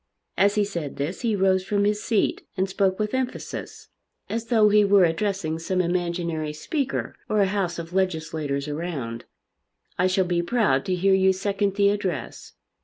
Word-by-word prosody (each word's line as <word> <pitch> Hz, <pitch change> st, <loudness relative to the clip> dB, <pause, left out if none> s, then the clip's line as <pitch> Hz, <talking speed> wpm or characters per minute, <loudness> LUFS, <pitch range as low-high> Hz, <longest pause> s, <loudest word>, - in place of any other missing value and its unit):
As 200 Hz, +2 st, +3 dB
he 210 Hz, -1 st, +2 dB
said 170 Hz, -8 st, -5 dB
this 145 Hz, +7 st, -3 dB
he 230 Hz, -4 st, +1 dB
rose 190 Hz, -1 st, +2 dB
from 200 Hz, +1 st, 0 dB
his 210 Hz, 0 st, +1 dB
seat 220 Hz, -4 st, 0 dB, 0.2 s
and 190 Hz, +1 st, +1 dB
spoke 190 Hz, 0 st, +1 dB
with 210 Hz, -1 st, -2 dB
emphasis, 260 Hz, -1 st, -4 dB, 0.4 s
as 230 Hz, 0 st, -2 dB
though 220 Hz, -3 st, +4 dB
he 210 Hz, 0 st, +5 dB
were 200 Hz, -1 st, +5 dB
addressing 170 Hz, -1 st, 0 dB
some 185 Hz, +3 st, -1 dB
imaginary 170 Hz, -3 st, -1 dB
Speaker 270 Hz, -, -3 dB
or 215 Hz, -, +2 dB
a 200 Hz, -, +5 dB
house 190 Hz, -3 st, -1 dB
of 170 Hz, +1 st, -7 dB
legislators 160 Hz, -6 st, -1 dB
around. 145 Hz, -7 st, -4 dB, 0.7 s
"I 180 Hz, -, +4 dB
shall 185 Hz, 0 st, +2 dB
be 175 Hz, -1 st, 0 dB
proud 175 Hz, -, +1 dB
to 185 Hz, -, 0 dB
hear 190 Hz, +2 st, +3 dB
you 190 Hz, 0 st, +4 dB
second 195 Hz, +1 st, -1 dB
the 200 Hz, -1 st, +4 dB
address. 185 Hz, -, -3 dB
190 Hz, 175 wpm, -24 LUFS, 170-205 Hz, 0.7 s, he